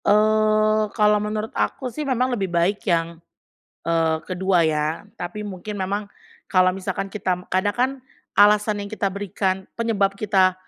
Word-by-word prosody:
Eee, 215 0 +3
kalau 210 -1 +4
menurut 215 +1 -3
aku 255 -3 -2
sih 305 - -4
memang 255 -3 0
lebih 195 -5 -1
baik 175 +4 +1
yang, 165 -1 0 0.6
eee, 165 -1 +2
kedua 185 -1 +2
ya. 155 +3 0
Tapi 175 +1 -5
mungkin 205 0 -6
memang 200 +3 -1 0.4
kalau 185 -1 +3
misalkan 195 +1 -3
kita, 185 -3 -3
kadang 195 +2 0
kan, 250 +2 +2 0.5
alasan 210 +1 +5
yang 200 - -9
kita 215 -2 0
berikan, 195 -1 -2
penyebab 215 -4 0
kita 195 -2 +2
200 Hz, 145 wpm, -23 LUFS, 185-215 Hz, 0.6 s, alasan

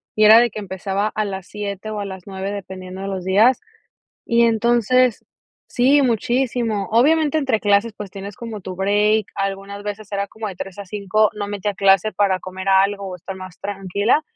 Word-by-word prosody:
y 215 - +4
era 220 +2 +9
de 240 0 +3
que 215 - -6
empezaba 195 +1 -2
a 215 0 -2
las 190 -2 -6
7 205 0 -5
o 215 -1 -4
a 200 - -4
las 190 -2 -8
9 195 0 -4
dependiendo 190 -1 -7
de 195 - -4
los 190 -2 -4
días. 215 - +4 0.6
Y 235 0 +3
entonces, 235 +1 +2 0.4
sí, 270 +4 +4
muchísimo. 235 -3 0
Obviamente, 305 +5 +3
entre 265 -7 0
clases, 205 +2 +2
pues, 205 -2 -7
tienes 200 +1 -8
como 225 -3 -7
tu 185 -1 -7
break, 205 +2 +2
algunas 195 +1 -4
veces, 205 0 -7
era 200 0 -2
como 220 -1 -6
de 190 - -7
3 195 +1 -7
a 200 - -6
5, 210 +2 +1
no 205 -1 -4
metía 205 0 -3
clase 195 +2 +3
para 195 -2 +1
comer 190 +1 -6
algo 195 +1 +3
o 180 - -6
estar 190 +2 -8
más 185 -2 -10
tranquila, 200 - 0
205 Hz, 190 wpm, -20 LUFS, 195-220 Hz, 0.6 s, era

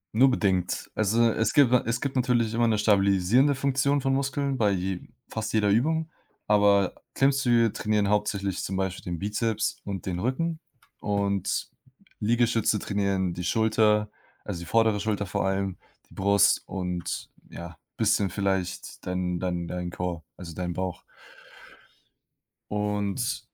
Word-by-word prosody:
Nur 130 +3 +6
bedingt. 95 -7 0
Also, 115 +2 +3
es 115 - +1
gibt 140 -5 +5
na 125 - +4
es 115 +1 -1
gibt 140 -1 -3
natürlich 120 -3 +1
immer 115 0 +2
'ne 110 - +2
stabilisierende 105 +6 +3
Funktion 140 +1 +1
von 135 0 0
Muskeln 140 0 -1
bei 105 -4 +3
je 95 -1 -2 0.3
fast 110 -1 -4
jeder 105 -2 +2
Übung. 160 +9 +1 0.4
Aber 100 -2 +4 0.2
Klimmzüge 125 -5 +3
trainieren 105 -1 0
hauptsächlich 100 -2 0
zum 95 0 -3
Beispiel 95 -1 -2
den 85 -2 -4
Bizeps 105 +2 -1
und 95 -3 -5
den 90 -2 -2
Rücken 155 - -1 0.4
und 100 -2 -1 0.5
Liegestütze 115 -1 +2
trainieren 100 -3 -1
die 90 +1 -5
Schulter, 105 +1 +2 0.4
also, 85 - -5
die - - -7
vordere 110 0 +2
Schulter 105 -1 -1
vor 90 - -2
allem, 95 -1 -1 0.3
die - - -18
Brust 100 0 +3
und 90 -2 -4 0.2
ja, 85 -1 -9 0.2
bisschen 100 -2 +2
vielleicht 95 -1 -3
dein 90 -1 -1
dein 90 -2 -2
dein 90 -1 -4
Core, 90 -2 -4
also, 85 -3 -8
dein 90 +1 -3
Bauch. 90 0 -4 1.7
Und 105 +3 -1
105 Hz, 145 wpm, -26 LUFS, 95-115 Hz, 1.7 s, Nur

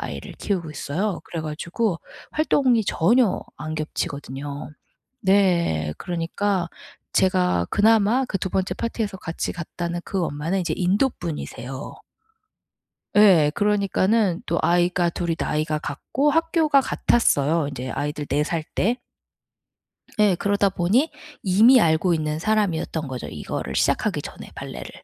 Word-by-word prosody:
아이를 - - -6
키우고 175 -6 -2
있어요. 165 +6 -2
그래 165 - -5
가지고 170 +5 -2 0.3
활동이 260 -7 +2
전혀 220 +6 +2
안 155 +1 -5
겹치거든요. 145 -1 -5 0.5
네. 175 - +2
그러니까 175 +1 -2 0.4
제가 180 - +2
그나마 225 +4 +3
그 195 - -2
2 185 - -2
번째 190 0 -1
파티에서 220 -4 -3
같이 165 -2 -4
갔다는 175 0 -4
그 190 -3 -2
엄마는 160 +7 -2
인제 175 - -1
인도 195 +9 +2
분이세요. 145 -5 -6 1.2
예. 185 -8 +6
그러니까는 205 -1 +1
또 - - 0
아이가 175 0 +2
둘이 170 0 -2
나이가 155 0 -1
같고 255 - -1
학교가 320 -2 +3
같았어요 160 - +2
인제 130 -2 -5
아이들 150 +2 -3
4 140 - -1
살 165 0 -2
때. 235 +6 +1 1.2
예, 210 -3 +5
그러다 200 +2 +1
보니 195 - +2 0.3
이미 220 +7 +6
알고 170 0 +3
있는 155 -1 -2
사람이었던 170 -6 0
거죠, 130 -1 -5
이거를 - - -5
시작하기 - - +1
전에 - - -9
발레를. 60 0 -7
180 Hz, 290 characters per minute, -23 LUFS, 155-210 Hz, 1.2 s, 예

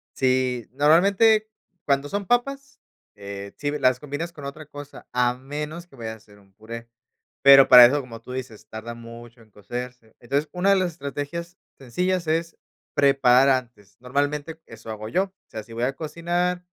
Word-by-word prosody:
Sí, 130 -2 0
normalmente 200 +9 +4 0.4
cuando 140 0 +1
son 200 0 -3
papas, 275 +5 -1 0.4
eh, 100 0 -8
sí 145 -1 -2
las 130 -1 +3
combinas 150 +4 -5
con 145 -3 -10
otra 150 +2 -8
cosa, 145 0 -11
a 125 0 +2
menos 150 +6 -7
que 135 - -19
vayas 110 -2 -6
a - - -15
hacer 105 -1 -20
un 95 -1 -25
puré. 115 +3 -10 0.5
Pero 135 -1 +9
para 125 -1 +11
eso, 140 +4 +2
como 115 -3 -11
tú 125 - -11
dices, 130 -4 -7
tarda 110 +2 -7
mucho 115 0 -12
en 110 -2 -22
cocerse, 120 +2 -8
entonces 140 +5 -2
una 185 +2 +2
de - - +6
las 185 -2 0
estrategias 170 +4 -6 0.2
sencillas 175 +7 -2
es 165 +1 -1 0.4
preparar 135 -1 +5
antes, 120 -7 -2
normalmente 145 +5 -2
eso 115 0 -12
hago 110 0 -6
yo, 185 +7 +2
o 190 - -19 0.2
sea, 110 - -6
si 110 - -17
voy 115 - -3
a 135 +2 0
cocinar, 175 +3 -2
135 Hz, 175 wpm, -24 LUFS, 120-165 Hz, 0.5 s, para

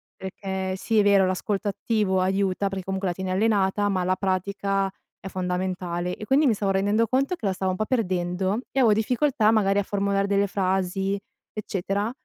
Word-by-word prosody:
perché 190 0 -4
sì 220 +3 +1
è - - +5
vero 200 -1 +5
l'ascolto 195 +2 -1
attivo 200 -2 0
aiuta 195 +1 0
perché 190 -1 -5
comunque 190 0 -2
la - - -1
tieni 190 +1 -4
allenata, 205 0 +2
ma 185 -2 0
la 185 +1 +1
pratica 195 +1 -1 0.3
è - - -8
fondamentale. 180 -1 -2
E, 215 - -7
quindi, 275 +7 +3
mi 240 - +4
stavo 200 -1 0
rendendo 205 +4 +2
conto 275 - +1
che 230 - -8
la 195 - +1
stavo 185 0 -1
un 185 - -4
po' 215 - -1
perdendo, 185 -3 0
e 270 - 0
avevo 235 -4 +5
difficoltà, 240 +1 +2
magari, 205 -2 +3
a - - 0
formulare 200 0 0
delle 200 0 +2
frasi, 190 0 0 0.4
eccetera; 200 +1 -2
195 Hz, 185 wpm, -25 LUFS, 185-210 Hz, 0.4 s, è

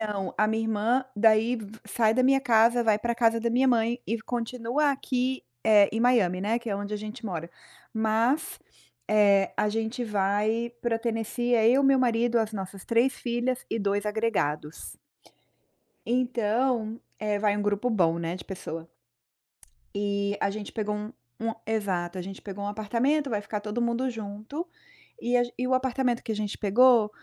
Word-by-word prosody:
Não, 205 -4 -3
a 215 - +3
minha 220 +1 0
irmã 225 +4 +1
daí 225 +3 +4
v 215 -2 -9
sai 220 0 +2
da 255 - +3
minha 270 +1 +4
casa, 235 -1 +4
vai 215 -2 +3
pra 235 +2 -1
casa 230 -1 +2
da 235 - 0
minha 255 +3 +3
mãe 235 0 +2
e 230 +1 -2
continua 245 +5 -1
aqui, 260 -1 -1 0.2
eh, 205 -2 +6
em 225 - -1
Miami, 225 -7 +3
né, 215 +4 0
que 235 -1 -8
é 200 - -1
onde 205 +1 -5
a - - -1
gente 215 +3 -8
mora. 170 -5 -4 0.4
Mas, 225 +7 +1 0.5
eh, 200 -2 +4
a 210 - +2
gente 225 +3 -2
vai 210 +3 0
pra 230 -2 0
Tennessee. 235 +1 -1
É 225 -1 +4
eu, 270 +3 +4
meu 270 -1 +5
marido, 240 -1 +2
as 220 -1 -1
nossas 195 -1 -6
3 235 +3 +2
filhas 245 +1 -2
e 225 - -1
2 200 0 0
agregados. 205 -9 -2 1.1
Então, 235 -1 0 0.2
eh, 210 -1 0
vai 205 -1 +2
um - - -1
grupo 205 +4 0
bom, 170 -7 +2
né, 170 +1 -3
de 185 - -9
pessoa. 165 -3 -7 1.1
Eh, 200 0 -1
a - - +1
gente 205 0 -6
pegou 210 -2 -2
um 210 +1 -6 0.3
um 225 0 -1
exato, 190 -5 -2
a - - -3
gente 195 +2 -8
pegou 200 0 -6
um - - -2
apartamento, 235 +8 0
vai 215 -4 0
ficar 210 0 -4
todo 210 +3 -3
mundo 235 +2 0
junto 220 - -6 0.5
e 245 +1 +2
a 245 - +3
e 250 - -1
o 255 - +1
apartamento 255 -1 0
que 220 - -3
a - - -4
gente 210 -1 -3
pegou, 225 +1 +5
225 Hz, 180 wpm, -27 LUFS, 205-240 Hz, 1.1 s, eh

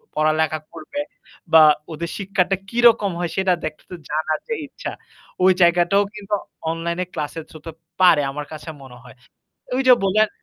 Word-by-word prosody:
পড়ালেখা 155 0 +1
করবে 165 - -6 0.5
বা 160 - +9 0.3
ওদের 170 +2 -5
শিক্ষাটা 195 -1 0
কিরকম 230 -4 +4
হয় 175 -2 -2
সেটা 190 -1 +3
দেখতে 155 +3 -8 0.2
জানার 155 +1 -1
যে - - 0
ইচ্ছা। - - -7 0.5
ওই 190 - +7
জায়গাটাও 175 +3 +4
কিন্তু 210 0 -2 0.4
অনলাইন 170 +1 -3
ক্লাসের 155 +2 -4
থ্রুতে 160 +1 -10 0.3
পারে 175 -5 +6
আমার 150 +1 -6
কাছে 155 +2 -8
মনে 125 -2 -13
হয়। 125 -3 -14 0.6
ওই 265 - +1
যে 250 - +10
বললেন 215 +2 +3
170 Hz, 150 wpm, -21 LUFS, 155-195 Hz, 0.6 s, যে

